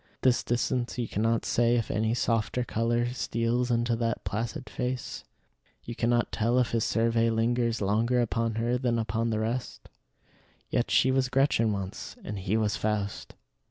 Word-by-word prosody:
At - - -41
this 130 -2 +3
distance 120 +1 -1
you 120 -2 -1
cannot 115 +2 0
say 120 0 +3
if 115 -3 -1
any 110 +2 +1
softer 115 0 0
color 120 +1 0
steals 120 0 0
into 120 0 +1
that 115 -1 -1
placid 105 +4 -3
face; 125 -1 -4 0.6
you 120 - -6
cannot 120 +1 +1
tell 115 +3 +1
if 125 -2 +2
his 115 -2 +1
survey 115 0 +2
lingers 115 0 +1
longer 115 +5 +2
upon 115 -1 0
her 120 +2 0
than 120 -2 +1
upon 115 +1 -1
the 110 - 0
rest. 115 +3 -3 0.8
Yet - - +1
she 130 - +4
was 130 -1 +1
Gretchen 130 -4 +2
once, 100 -2 -5
and 105 -1 -5
he 95 +3 0
was 105 -2 +1
Faust. 105 -1 -3
115 Hz, 165 wpm, -28 LUFS, 110-120 Hz, 0.8 s, she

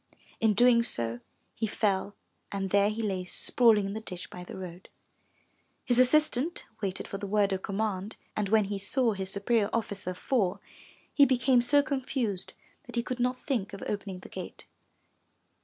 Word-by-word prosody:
In 220 -2 +3
doing 240 +1 +6
so 115 - 0 0.3
he 220 - -2
fell, 200 -1 0 0.4
and 195 -2 -3
there 200 0 +4
he 220 +1 -3
lay 190 -3 -1
sprawling 215 +3 +3
in 195 - -3
the 220 - -5
ditch 180 -4 -7
by 180 - -8
the 180 - -9
road. 180 0 -9 1.0
His 245 0 +3
assistant 300 +3 +3 0.2
waited 195 -2 -3
for 195 - -5
the 200 - -4
word 200 -1 +2
of 190 - -2
command, 200 0 -3 0.2
and 210 -2 -1
when 220 0 +5
he 200 0 -3
saw 235 +3 +2
his 190 -1 -4
superior 205 +2 +1
officer 200 -5 -3
fall, 195 -3 0 0.5
he 285 - +6
became 250 -1 +3
so 285 +4 +4
confused 255 -8 -2 0.3
that - - -8
he 235 - +1
could 250 0 -4
not 250 +1 -1
think 225 -8 -1
of 195 - -7
opening 200 -3 -4
the - - -11
gate. - - -7
210 Hz, 175 wpm, -29 LUFS, 195-245 Hz, 1.0 s, doing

